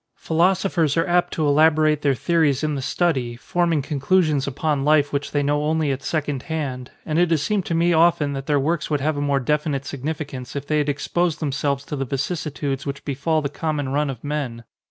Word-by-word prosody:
Phi - - -7
losophers 170 -3 +2
are 165 - +3
apt 175 0 +2
to 155 - 0
elaborate 155 +1 +4
their 140 -2 +2
theories 155 -2 +1
in 155 -1 0
the 140 - -3
study, 130 -5 0
forming 165 +3 0
conclusions 150 0 +1
upon 140 +1 -1
life 145 -1 +3
which 140 0 -1
they 145 -1 0
know 145 +1 +1
only 155 -1 +1
at 135 0 -3
second 145 -2 -2
hand, 135 -6 -3 0.2
and 155 +1 0
it 175 -1 +3
has 160 -3 +1
seemed 205 +2 -1
to 165 - -1
me 170 +1 +3
often 160 -3 +3
that 135 0 -5
their 145 -2 +2
works 155 +3 -1
would 150 -2 +1
have 150 +3 0
a 145 - -2
more 140 -1 +1
defi 150 +4 0
nite 140 -1 -2
significance 140 -2 -5
if 140 - -4
they 155 +1 +1
had 145 0 0
exposed 165 +3 -1
themselves 140 -2 -1
to - - -4
the 135 - -2
vicissitudes 140 0 -3
which 140 -1 -6
befall 150 +3 0
the - - 0
common 145 -1 -3
run 145 +2 0
of 125 -4 -7
men. 140 -6 -3
150 Hz, 215 wpm, -22 LUFS, 140-160 Hz, 0.2 s, elaborate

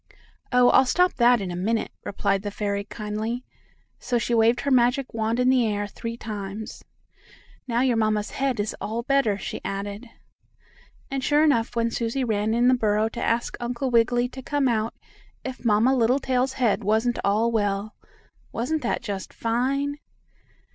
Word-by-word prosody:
"Oh! 250 -1 +5
I'll 260 - +5
stop 360 +6 +3
that 240 -2 +5
in 185 -2 -4
a - - -4
minute," 220 +5 -1
replied 195 -1 -1
the 205 - -4
fairy 200 0 -2
kindly, 215 +3 -4 0.5
so 245 - -1
she 235 +1 -1
waved 230 +1 +3
her 280 - -1
magic 250 +1 +2
wand 225 +1 -1
in 250 - +2
the 250 -3 +3
air 205 -1 -1
three 230 +3 -6
times. 210 -1 -6 0.8
"Now 235 -1 +1
your 250 -3 +2
mamma's 215 -1 0
head 270 -4 -1
is 205 +1 -2
all 230 +2 -3
better," 270 -6 +2
she - - -6
added. 200 +4 -5 1.0
And, 270 -1 -2
sure 295 +2 +3
enough, 240 -7 +2
when 230 0 +1
Susie 235 +3 -1
ran 220 -1 0
in 240 +1 +3
the 255 - +6
burrow 215 -2 +1
to 235 - -6
ask 235 +1 0
Uncle 245 +2 -2
Wiggily 240 +1 +3
to 265 - -9
come 285 +1 0
out, 225 -2 0 0.5
if 260 -1 -7
Mamma 230 +3 +3
Littletail's 255 +1 +1
head 240 -7 +1
wasn't 220 +4 +1
all 215 +4 +2
well. 205 -1 -1 0.6
Wasn't 295 +7 -2
that 240 - -2
just 195 -3 -5
fine? 275 +5 -1
230 Hz, 170 wpm, -25 LUFS, 215-250 Hz, 1.0 s, the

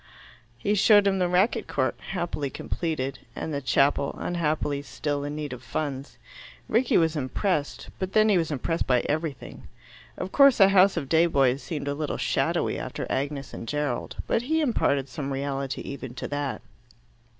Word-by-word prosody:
He 200 - 0
showed 205 0 +6
him 195 -1 +2
the 180 - +2
racquet 195 +6 +2
court, 130 -3 0
happily 170 -6 -3
completed, 140 -4 -3 0.2
and 160 - -4
the 140 - -2
chapel, 140 +1 +2
unhappily 155 -4 -1
still 145 +2 -3
in 145 +1 -4
need 150 -3 -4
of 125 - -8
funds. 135 +2 -4 0.5
Rickie 235 +3 +3
was 165 -1 +2
impressed, 145 - -2
but 190 0 -3
then 215 0 +5
he 210 - +4
was 165 - -1
impressed 160 +3 -2
by 125 -2 +3
everything. 155 -2 -4 0.5
Of 185 +1 -4
course 275 -4 +6
a 195 -1 +8
House 195 0 +5
of 140 - -2
day 165 +4 +4
boys 135 -4 +2
seemed 145 -4 -5
a 140 - 0
little 150 +1 -3
shadowy - - 0
after - - -5
Agnes 140 0 -3
and 115 - -7
Gerald, 145 -3 -2
but - - +1
he 315 +6 0
imparted 140 - +1
some 135 +2 -5
reality 135 0 -3
even 130 -3 -7
to - - -4
that. 145 -2 -3
150 Hz, 170 wpm, -26 LUFS, 140-180 Hz, 0.5 s, a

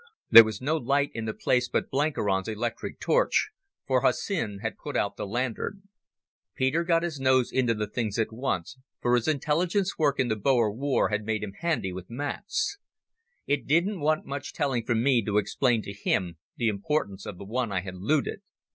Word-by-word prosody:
There 115 - +12
was 110 -2 -4
no 150 +5 +1
light 140 +1 +1
in 115 -1 -4
the 110 - -1
place 125 -1 +1
but - - -1
Blenkiron's 115 -10 0
electric 115 +2 -4
torch, - - +2 0.3
for - - +2
Hussin 110 - 0
had 110 - -3
put 145 - -4
out 100 - 0
the - - -5
lantern. 125 - -3 0.7
Peter 130 +6 +1
got 170 -1 +2
his 165 -5 -3
nose 130 -2 +3
into 125 -3 +2
the 105 0 -1
things 105 -1 -3
at 110 -1 -1
once, 125 -1 -3 0.2
for 120 - +1
his 120 -2 +2
intelligence 170 +7 0
work 145 -3 +2
in 130 - +2
the 110 - 0
Boer 115 -1 +2
War 135 +4 +1
had 105 0 -1
made 110 0 -2
him 100 -2 -5
handy 160 - -1
with 90 0 -8
maps. 145 - -3 0.7
It 145 -4 -1
didn't 175 +6 +2
want 155 +1 +1
much 140 0 -5
telling 130 -6 -1
from 115 -1 +1
me 130 -4 +3
to 105 0 0
explain 115 +2 +1
to 100 - -7
him 90 -4 -1 0.2
the 120 - +1
importance 100 -2 -2
of 95 - -6
the 100 - -9
one 115 +2 -2
I 95 -2 0
had 95 0 -7
looted. 140 - 0
125 Hz, 190 wpm, -27 LUFS, 105-145 Hz, 0.7 s, There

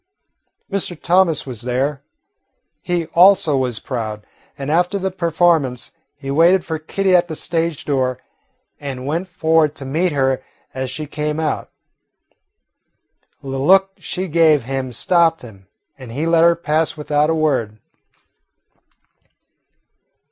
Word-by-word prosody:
Mr. 185 -4 -3
Thomas 180 -3 +2
was 125 -5 -7
there. 135 +4 -1 0.8
He 175 -2 -1
also 175 -4 +5
was 125 -4 -1
proud, 110 -5 -5 0.3
and 140 0 -4
after 180 +4 +2
the 190 0 -2
performance 165 -7 +1 0.2
he 135 -1 -6
waited 170 +5 +4
for 160 -1 -3
Kitty 190 +4 +1
at 175 0 +3
the 160 - -5
stage 165 -1 -2
door 130 -3 0 0.6
and 135 -3 -6
went 165 +6 -2
forward 160 -4 +1
to 135 - -8
meet 165 +7 0
her 135 -2 0 0.3
as 130 0 -4
she 150 +4 -5
came 150 +1 -3
out. 160 -1 -2 1.7
The 135 - -7
look 190 +9 +3
she 185 +2 -4
gave 160 -4 +3
him 130 0 -4
stopped 165 +4 +2
him, 100 -5 -14 0.3
and 125 -3 -10
he 145 +7 -2
let 165 0 +3
her 170 0 +5
pass 160 -1 -1
without 150 0 +1
a 160 - +1
word. 130 -9 0
155 Hz, 135 wpm, -19 LUFS, 135-170 Hz, 1.7 s, also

